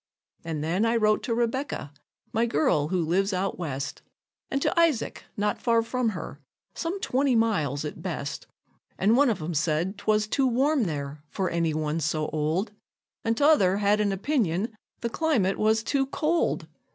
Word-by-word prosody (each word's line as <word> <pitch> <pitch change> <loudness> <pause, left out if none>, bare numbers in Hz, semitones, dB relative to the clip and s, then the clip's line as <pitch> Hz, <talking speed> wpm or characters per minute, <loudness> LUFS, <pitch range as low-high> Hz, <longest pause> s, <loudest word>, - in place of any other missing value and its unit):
An' 160 -2 -3
then 170 +7 0
I 230 +1 +2
wrote 215 -2 +3
to 230 - 0
Rebecca, 240 - -2 0.4
my 230 +2 +2
girl 150 -6 +2
who 175 -1 0
lives 195 +5 +1
out 185 +1 -1
West, 140 -5 -4 0.5
And 275 - 0
to - - +1
Isaac, 325 -9 +1
not 205 0 0
far 230 -1 +3
from 240 +1 0
her 155 - -7 0.3
some 345 +4 -3
twenty 265 -3 +2
miles 155 - +1
at 150 - -6
best; 160 -6 -4 0.5
And 210 +4 +3
one 280 +1 +5
of 220 - 0
'em 170 +2 -3
said 165 +5 0
'twas 210 0 +2
too 265 +5 +1
warm 265 +1 +2
there 145 -3 -4
for 190 -1 -2
any 165 -2 0
one 155 +1 -1
so 155 -1 -1
old, 160 +7 -1 0.5
And 225 0 0
t'other 280 -11 +4
had 205 +1 +3
an 205 -1 +1
opinion 210 - 0 0.3
the 235 - 0
climate 240 -13 +1
was 220 +1 +3
too 270 +2 +1
cold. 320 +5 0
205 Hz, 170 wpm, -26 LUFS, 160-235 Hz, 0.5 s, one